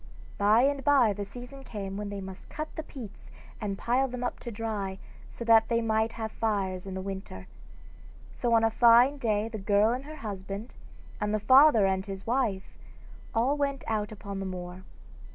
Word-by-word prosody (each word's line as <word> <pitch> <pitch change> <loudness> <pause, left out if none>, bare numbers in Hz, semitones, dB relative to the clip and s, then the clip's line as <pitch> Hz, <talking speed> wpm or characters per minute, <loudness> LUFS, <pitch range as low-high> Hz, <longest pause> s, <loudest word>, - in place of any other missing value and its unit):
By 210 +4 +5
and 280 0 +1
bye 260 -7 +4
the 205 - -4
season 245 +6 -10
came 195 -5 -6
when 205 0 -4
they 200 -1 -5
must 190 0 -10
cut 310 +1 -6
the - - -3
peats 255 -9 -11 0.3
and 200 -2 -3
pile 255 +5 +1
them 250 -1 -5
up 245 - -3
to 240 - -7
dry, 205 -4 -4 0.3
so 235 - -8
that 225 -1 +5
they 230 -1 +2
might 220 0 0
have 220 -1 -4
fires 195 -5 -2
in 190 - -5
the 190 - -4
winter. 190 - -7 0.9
So 240 - -1
on 225 - +4
a 225 - +3
fine 240 +5 +5
day 215 -3 0
the 225 -1 -6
girl 205 +2 +3
and 260 +2 -5
her 310 +1 -8
husband, 200 -1 -6 0.5
and 210 0 -1
the - - 0
father 260 0 +6
and 190 0 +1
his 195 -1 -7
wife 225 -6 -1 0.6
all 250 +6 +2
went 280 -2 -1
out 215 -1 -2
upon 200 -2 -6
the 195 - -3
moor. 180 0 -7
220 Hz, 190 wpm, -28 LUFS, 195-245 Hz, 0.9 s, father